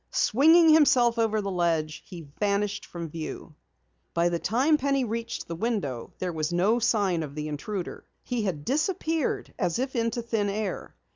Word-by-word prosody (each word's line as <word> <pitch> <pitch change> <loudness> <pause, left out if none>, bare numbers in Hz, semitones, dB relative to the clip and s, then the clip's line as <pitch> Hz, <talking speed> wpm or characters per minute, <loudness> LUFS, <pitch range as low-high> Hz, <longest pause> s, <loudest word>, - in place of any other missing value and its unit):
Swinging 320 +7 +5
himself 260 -7 +5
over 220 -1 +1
the 200 -1 -3
ledge, 165 -3 0
he 175 -2 -8 0.2
vanished 205 0 0
from 170 -1 -6
view. 160 0 -7 0.6
By 170 +1 +3
the 170 -1 -1
time 265 - +2
Penny 275 -1 +1
reached 230 0 -4
the 170 - -4
window 175 - -2
there 180 -2 -3
was 155 0 -2
no 195 +7 +2
sign 205 -7 +1
of 145 -2 -6
the 150 0 -4
intruder. 175 +6 -5 0.2
He 245 -2 -2
had 175 -8 -3
disappeared 315 +1 -1
as 170 - 0
if 260 +2 -3
into 230 0 -1
thin 220 -3 -1
air. 205 -1 -4
210 Hz, 165 wpm, -27 LUFS, 170-245 Hz, 0.6 s, Swinging